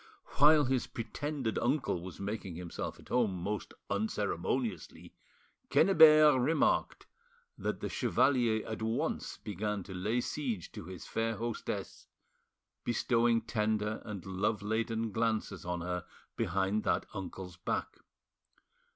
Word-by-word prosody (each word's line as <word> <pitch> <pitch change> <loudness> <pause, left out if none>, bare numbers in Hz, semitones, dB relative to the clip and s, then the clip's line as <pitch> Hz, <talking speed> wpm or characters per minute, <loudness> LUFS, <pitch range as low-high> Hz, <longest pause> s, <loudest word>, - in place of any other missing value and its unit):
While 150 +1 +7
his 130 -1 0
pretended 125 +1 -3
uncle 125 - 0
was 90 -1 -8
making 100 -3 -4
himself 85 0 -5
at - - -16
home 115 -6 +2
most 100 +4 -3 0.2
unceremoniously, 100 0 -2 0.6
Quennebert 155 -6 +7
remarked 160 +6 +1 0.5
that - - -3
the - - -1
chevalier 120 -5 +2
at 110 0 -5
once 110 +1 -2
began 105 0 -3
to 95 - -9
lay 105 +7 0
siege 120 - -3
to - - -8
his 90 -2 -8
fair 115 0 -1
hostess, 115 +1 -4 0.8
bestowing 120 0 +2
tender 105 -1 -1
and 105 -5 -7
love 100 +2 -1
laden 110 +1 -1
glances 110 -4 -1
on 90 0 -2
her 90 0 -3 0.3
behind 95 +4 0
that - - +1
uncle's 95 -3 -7
back. 90 - -3
110 Hz, 120 wpm, -32 LUFS, 95-120 Hz, 0.8 s, While